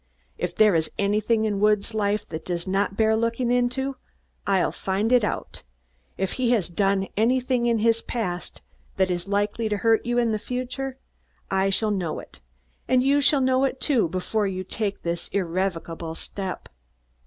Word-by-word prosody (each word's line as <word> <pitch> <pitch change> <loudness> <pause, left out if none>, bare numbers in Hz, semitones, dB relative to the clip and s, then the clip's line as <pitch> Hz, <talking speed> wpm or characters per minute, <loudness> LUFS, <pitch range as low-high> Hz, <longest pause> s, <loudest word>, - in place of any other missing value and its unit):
If 175 0 -3
there 215 -2 +5
is 160 -1 +1
anything 215 +2 +1
in 205 -2 0
Woods' 210 +1 +2
life 210 -1 0
that 160 -1 -5
does 175 -1 -3
not 195 +1 0
bear 220 0 +4
looking 230 +2 0
into, 250 +2 0 0.5
I'll 195 -2 +2
find 195 +4 -1
it 245 -3 +5
out; 205 - -3 0.6
if 190 0 -1
he 255 -2 0
has 200 -8 +1
done 195 +2 +1
anything 245 +2 +2
in 235 -1 +3
the 230 +1 +2
past 180 -8 -4 0.3
that 190 -1 +2
is 175 0 -2
likely 205 +2 0
to 210 - 0
hurt 225 +1 +3
you 240 0 -1
in 235 -2 +2
the 215 - -1
future, 255 +3 -4 0.5
I 190 0 +2
shall 210 +2 +2
know 180 -6 -2
it, - - -11 0.5
and 255 0 +3
you 280 +2 +3
shall 280 0 +4
know 260 0 +3
it, 270 -1 0
too, 250 - +2
before 200 +4 -1
you 185 -1 -3
take 200 +1 -3
this 170 0 -2
irrevocable 170 -3 -2
step." 190 +1 -5
210 Hz, 175 wpm, -25 LUFS, 190-240 Hz, 0.6 s, there